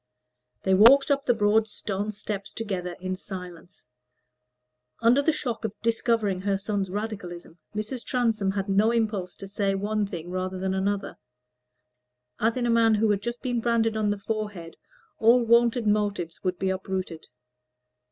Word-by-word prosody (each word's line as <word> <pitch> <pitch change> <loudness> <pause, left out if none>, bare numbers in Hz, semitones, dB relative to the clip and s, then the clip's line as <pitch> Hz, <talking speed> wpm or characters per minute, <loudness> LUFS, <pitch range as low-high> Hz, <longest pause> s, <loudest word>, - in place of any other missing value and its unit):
They 190 - +2
walked 255 +9 +7
up 280 0 +1
the 245 - +5
broad 215 +1 +3
stone 205 0 -3
steps 205 -1 -6
together 185 -5 -4
in 185 0 -3
silence. 180 -3 -10 1.1
Under 240 +5 +4
the 320 - +3
shock 245 -7 -4
of 215 -2 -4
discovering 225 -4 +1
her 200 0 0
son's 200 -1 -2
Radicalism, 185 -5 -6 0.2
Mrs. 220 +4 -4
Transome 225 -6 0
had 195 0 -2
no 200 +3 +3
impulse 215 -6 -1
to 195 - -9
say 195 0 0
one 205 +1 -1
thing 175 -2 -7
rather 185 0 -3
than 190 0 -1
another; 195 +1 -2 1.2
as 225 +3 +1
in 245 - 0
a 240 - +2
man 230 -1 +4
who 215 0 +2
had 200 -1 0
just 235 +2 -5
been 245 -2 -1
branded 225 -1 +1
on 215 -1 +1
the 205 - 0
forehead 200 -5 -5 0.4
all 235 +2 +5
wonted 235 0 +4
motives 205 -5 -1
would 185 -1 -1
be 190 +1 0
uprooted. 185 -3 -4
205 Hz, 160 wpm, -26 LUFS, 190-225 Hz, 1.2 s, walked